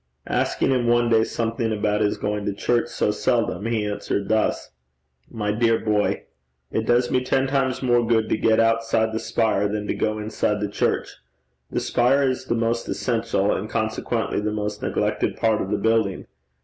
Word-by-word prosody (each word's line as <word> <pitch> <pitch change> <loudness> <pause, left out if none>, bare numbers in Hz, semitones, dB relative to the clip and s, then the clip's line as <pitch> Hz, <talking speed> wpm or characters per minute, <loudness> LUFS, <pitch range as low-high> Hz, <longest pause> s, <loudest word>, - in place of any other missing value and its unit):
Asking - - 0
him 125 -2 +1
one 120 0 +3
day 110 -1 +4
something 115 0 -2
about 105 0 0
his 105 -1 +1
going 105 0 -2
to 100 - 0
church 120 +3 +1
so 120 -3 0
seldom, 110 0 0
he 115 -2 0
answered 100 -1 -3
thus: 110 0 0 0.6
'My 105 -2 -2
dear 115 +1 +2
boy, 105 -2 0 0.5
it 110 - -1
does 120 +1 +2
me 125 0 +2
ten 130 +1 +1
times 135 -1 0
more 120 -1 +3
good 115 -1 +2
to - - +2
get 110 0 +2
outside 115 -1 +2
the 110 - -1
spire 110 -4 +1
than 105 0 -3
to - - -1
go 110 0 -1
inside 105 -1 -1
the 105 - -1
church. - - -1 0.5
The - - -1
spire 130 +4 +2
is 130 0 -2
the 120 - 0
most 115 0 -1
essential, 115 -4 0
and 105 - -4
consequently 110 +1 -1
the 105 0 -1
most 105 0 -3
neglected - - -1
part 110 -2 +2
of 95 - -4
the 105 - 0
building. 110 -2 +1
110 Hz, 185 wpm, -23 LUFS, 105-120 Hz, 0.6 s, day